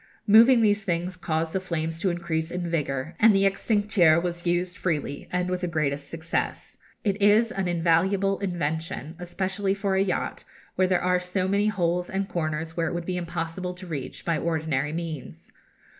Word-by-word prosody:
Moving 230 +3 +7
these 210 0 +3
things 175 0 -2
caused 160 -2 -2
the 190 - +1
flames 165 -3 -3
to 190 - +1
increase 170 -2 -2
in 180 0 -3
vigour, 150 -2 -2
and 220 -1 +6
the 195 - +3
extincteur 195 -4 +3
was 175 0 -4
used 175 +1 0
freely, 150 -5 -3
and 180 0 0
with 180 0 -2
the 180 - -1
greatest 145 -4 -2
success. 165 +1 -3 0.3
It 205 -2 -1
is 215 +3 +5
an 195 -5 -2
invaluable 180 +4 +2
invention, 165 -3 -3
especially 190 +3 -1
for 200 -1 -1
a 190 - +3
yacht, 195 -2 -2 0.3
where 185 - +2
there 180 -1 +1
are 180 0 +3
so 180 +1 -2
many 200 +2 +2
holes 180 -4 0
and 195 0 -2
corners 160 -2 -3
which 165 -1 0
it - - -3
would 170 -1 -3
be 185 - -2
impossible 175 +1 -4
to 185 +1 -9
reach 150 -7 -6
by 170 -2 +1
ordinary 155 -4 -1
means. 160 -4 -6
175 Hz, 180 wpm, -26 LUFS, 165-195 Hz, 0.3 s, Moving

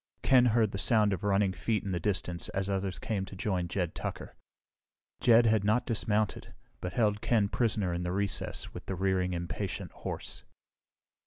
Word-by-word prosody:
Ken 130 -2 +6
heard 110 -3 +3
the 100 - -4
sound 105 +2 +3
of 95 - -4
running 100 -1 +2
feet 110 +3 -1
in 100 - -3
the 90 - -1
distance 90 -2 -2
as 95 +1 -1
others 95 -2 -2
came 100 0 -2
to 95 - -10
join 95 -2 -1
Jed 90 -1 -2
Tucker. - - -6 0.8
Jed 115 0 +6
had 110 -3 +3
not 110 +4 +2
dismounted, 105 -2 -1 0.2
but 90 -1 -5
held 105 -3 +1
Ken 110 -4 +2
prisoner 105 -5 0
in 85 - -2
the 90 0 -2
recess 100 +1 -2
with - - -9
the 95 - -2
rearing, 95 -1 0
impatient 85 0 -4
horse. - - -6
100 Hz, 175 wpm, -30 LUFS, 90-110 Hz, 0.8 s, Ken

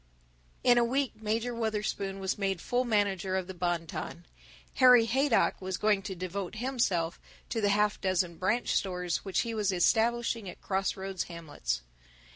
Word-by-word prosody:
In 245 -1 +6
a - - +4
week 255 -1 -1
Major 225 +3 -1
Wutherspoon 210 -3 -2
was 190 -1 -1
made 195 -3 -1
full 245 +7 0
manager 200 -4 +1
of 190 - -2
the 190 - -7
Bon 175 -2 -1
Ton. 170 +1 -6 0.6
Harry 250 -3 +8
Haydock 265 0 +2
was 185 -1 -3
going 210 -2 +2
to 195 -1 -5
devote 185 +2 -4
himself 215 -9 0 0.3
to 225 - -1
the 205 - +3
half 210 +1 +2
dozen 180 -3 0
branch 210 +7 0
stores 180 -3 0
which 195 -2 -1
he 230 -1 -3
was 210 -3 +1
establishing 225 +3 +1
at - - -10
crossroads 190 -1 -2
hamlets. 145 - -4
200 Hz, 160 wpm, -30 LUFS, 185-230 Hz, 0.6 s, Harry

